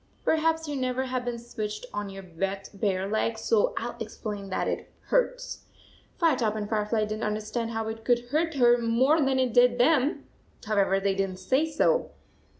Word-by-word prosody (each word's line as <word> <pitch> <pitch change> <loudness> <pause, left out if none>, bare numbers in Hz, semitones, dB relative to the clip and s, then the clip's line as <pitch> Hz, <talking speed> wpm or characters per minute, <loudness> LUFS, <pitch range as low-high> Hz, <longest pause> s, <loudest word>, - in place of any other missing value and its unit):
Perhaps 320 0 +2
you 295 - -3
never 255 0 -1
have 255 -1 -2
been 245 -1 -3
switched 215 -2 -5
on 205 -1 -3
your 195 0 -8
wet 195 +3 -3
bare 195 -2 -1
legs, 220 +2 -1
so 220 -2 +2
I - - -1
11 235 -1 -11
explain 210 -2 -5
that 185 - -1
it - - -3 0.2
hurts. - - 0 0.5
Firetop 255 - +2
and 210 -1 -3
Firefly 215 +1 0
did 215 0 -2
n 215 - -2
t - - -2
under 210 0 -1
stand 225 +2 -3
how 225 -1 -3
it 220 0 -5
could 240 0 +1
hurt 325 +1 +1
her 240 -2 +5
more 255 +7 +3
than 270 -1 +2
it 255 -3 +1
did 245 0 +5
them. 285 +3 +3 0.4
However, 200 -2 +2
they 195 0 +1
did 195 0 0
n 185 - -7
t 185 - -13
say 295 +5 +2
so. - - +2
230 Hz, 205 wpm, -27 LUFS, 210-260 Hz, 0.5 s, her